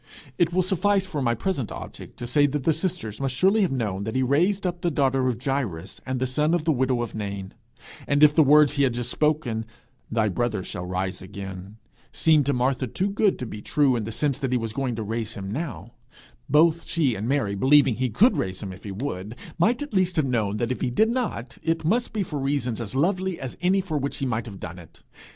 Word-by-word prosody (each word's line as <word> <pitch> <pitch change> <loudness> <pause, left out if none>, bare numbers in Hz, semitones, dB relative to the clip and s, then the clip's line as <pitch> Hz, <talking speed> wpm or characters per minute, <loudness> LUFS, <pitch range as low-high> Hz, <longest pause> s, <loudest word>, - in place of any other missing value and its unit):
It 170 -1 +3
will 185 +1 +2
suffice 195 +2 +1
for 165 -7 -4
my 120 -2 +1
present 140 - -2
object - - -9
to 120 - -5
say 145 +4 +3
that 145 -1 -2
the 160 - +3
sisters 160 - -3
must 135 -2 -1
surely 195 - +3
have 190 - +2
known 105 -7 -2
that 110 - -4
he 130 - +2
raised 175 +10 +2
up 175 -1 -2
the 175 - +1
daughter 135 -3 +1
of 125 -3 0
Jairus 115 - -3
and 130 0 -1
the 130 - +1
son 150 +6 +1
of 170 - -1
the 160 - +2
widow 130 -3 +1
of 120 - -6
Nain; 100 -2 -5 0.5
and 145 +1 +3
if 150 -1 +8
the 160 - +5
words 150 0 +6
he 140 - 0
had 130 -4 +2
just 120 0 -2
spoken, 150 -8 0 0.5
'Thy 110 -2 +2
brother 110 -1 -1
shall 90 0 -6
rise 95 +1 -3
again,' 95 +1 -8 0.3
seemed 155 -4 +3
to - - +3
Martha 130 +1 0
too 190 - -1
good 205 -1 +2
to 125 - -5
be 105 -2 -7
true 140 +2 +2
in 115 - -1
the 115 - -4
sense 140 +3 0
that 135 -3 -2
he 125 - +3
was 115 -2 -4
going 130 -2 -2
to 110 - -3
raise 110 +1 -3
him 95 0 -5
now, 120 - -5 0.6
both 160 +3 +4
she 150 -7 +1
and 110 +1 -4
Mary 135 -8 +1
believing 135 +5 +5
he 130 0 0
could 200 - +4
raise 95 -5 -3
him 95 -2 -5
if 90 - -14
he 100 - -5
would, 100 -1 -5 0.2
might 235 - +2
at 290 - -9
least 185 -2 +2
have 155 - +2
known 110 -5 0
that 120 +2 -1
if 130 - -3
he - - +1
did 220 - +3
not, 210 - -3
it 165 0 -1
must 235 +8 +1
be 215 -2 -1
for 150 -5 -4
reasons 135 -4 -1
as 105 -1 -5
lovely 185 +5 0
as 130 - -6
any 190 +2 +3
for 160 -5 -2
which 140 +1 -3
he 135 - -2
might 120 -2 -2
have 100 -3 -9
done 90 +2 -7
it. 85 - -16
130 Hz, 240 wpm, -25 LUFS, 110-160 Hz, 0.6 s, if